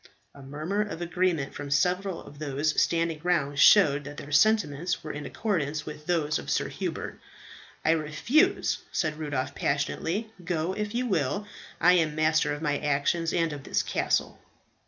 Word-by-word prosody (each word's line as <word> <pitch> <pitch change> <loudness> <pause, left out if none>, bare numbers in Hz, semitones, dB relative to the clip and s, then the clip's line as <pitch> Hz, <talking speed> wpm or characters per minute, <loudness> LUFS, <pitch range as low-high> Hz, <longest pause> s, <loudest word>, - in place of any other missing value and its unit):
A 140 - -13
murmur 155 +9 -3
of 205 -5 -4
agreement 175 -4 0
from 145 - -6
several 180 +5 0
of 145 - -13
those 150 +1 0
standing 165 -2 0
round 150 -5 0
showed 150 -8 +6
that 145 0 -8
their 145 - -8
sentiments 175 -2 +2
were 155 - -5
in 150 0 -6
accordance 155 -8 -2
with 150 0 -9
those 155 -4 +1
of - - -8
Sir - - 0
Hubert. - - -5 0.7
"I - - +5
refuse," 185 - +2
said 155 -1 -1
Rudolph 140 -3 -2
passionately. 165 +11 -1
"Go, 170 +1 -1
if 210 +2 -4
you 250 +1 0
will. 195 - 0 0.3
I 180 +1 +6
am 160 -4 +2
master 155 -1 +2
of 145 +2 -4
my 145 -2 0
actions, 150 +3 0
and 165 -2 0
of 140 -2 -8
this - - 0
castle." - - -1
155 Hz, 165 wpm, -27 LUFS, 145-180 Hz, 0.7 s, showed